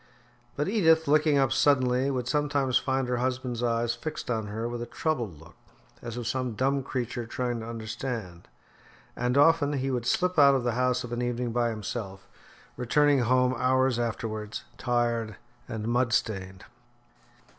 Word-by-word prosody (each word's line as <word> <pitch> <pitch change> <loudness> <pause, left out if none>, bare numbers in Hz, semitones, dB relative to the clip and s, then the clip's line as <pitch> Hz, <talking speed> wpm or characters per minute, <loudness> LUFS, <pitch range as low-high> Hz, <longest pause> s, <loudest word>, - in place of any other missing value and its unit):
But 145 - -1
Edith, 165 -7 +3
looking 150 0 +4
up 135 -2 +2
suddenly, 130 -2 +3
would 125 -3 -2
sometimes 140 -2 +1
find 130 -1 -1
her 125 0 0
husband's 125 -1 -2
eyes 115 -1 +1
fixed 125 +1 -5
on 110 -3 -2
her 110 +3 -3
with 120 0 -5
a 120 - -5
troubled 120 - -2
look 80 +2 -15 0.5
as 120 0 -6
of 120 - -4
some 125 0 -2
dumb 135 +4 +1
creature 120 -3 -4
trying 120 0 -2
to 110 - -7
understand; 110 -5 -5 0.7
and 125 +2 0
often 145 0 +4
he 135 -1 -1
would 120 -2 -2
slip 180 +4 +1
out 140 -1 +7
of 130 - 0
the 120 - +1
house 125 +1 +1
of 120 - -7
an 120 - -2
evening 120 0 -2
by 120 0 +1
himself, 105 -3 -6 0.5
returning 145 +3 +3
home 125 +1 +3
hours 130 0 +2
afterwards, 110 -2 -3 0.2
tired 120 -3 0 0.3
and 110 0 -4
mud 120 0 +1
stained. 95 -7 -2
125 Hz, 165 wpm, -27 LUFS, 115-135 Hz, 0.7 s, out